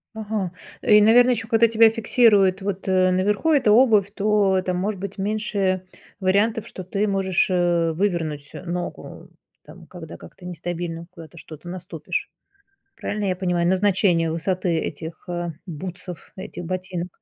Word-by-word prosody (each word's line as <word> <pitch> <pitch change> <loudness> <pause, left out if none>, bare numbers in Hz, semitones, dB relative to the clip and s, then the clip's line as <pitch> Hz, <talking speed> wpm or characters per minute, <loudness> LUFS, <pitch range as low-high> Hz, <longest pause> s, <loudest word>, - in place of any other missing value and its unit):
Ага. 210 -4 -3 0.3
И, 210 0 +6
наверно, 240 +4 +6
еще 225 -2 -2
когда 225 +1 +4
тебя 225 0 +6
фиксирует 220 -4 +3
вот, 195 -1 -4
э, 185 -1 +3
наверху 205 - +1
эта 260 -8 +4
обувь, 215 -4 +5
то 205 -2 +2
там 180 -1 -1
может 195 +2 -2
быть 200 +1 -6
меньше 195 -2 -1 0.3
вариантов, 205 +4 +1
что 185 - -8
ты 200 +3 -1
можешь, 195 -2 +1
э, 175 -2 +2
вывернуть, 160 -6 -2
э, - - -8
ногу. 175 0 -6 0.3
Там, - - -14
когда - - -10
как-то 180 - -14
нестабильно 170 -1 -5
куда-то 170 -1 -13
что-то 160 +1 -11
наступишь. 175 -4 -4 0.7
Правильно 205 -1 -3
я 185 -1 0
понимаю, 180 -2 0
назначение 185 -3 +2
высоты 180 +2 -1
этих, 160 +3 -7
а, 175 -1 -3
бутсов, 180 +1 -8
этих 190 -2 -7
ботинок? 180 0 -4
185 Hz, 145 wpm, -23 LUFS, 175-210 Hz, 0.7 s, И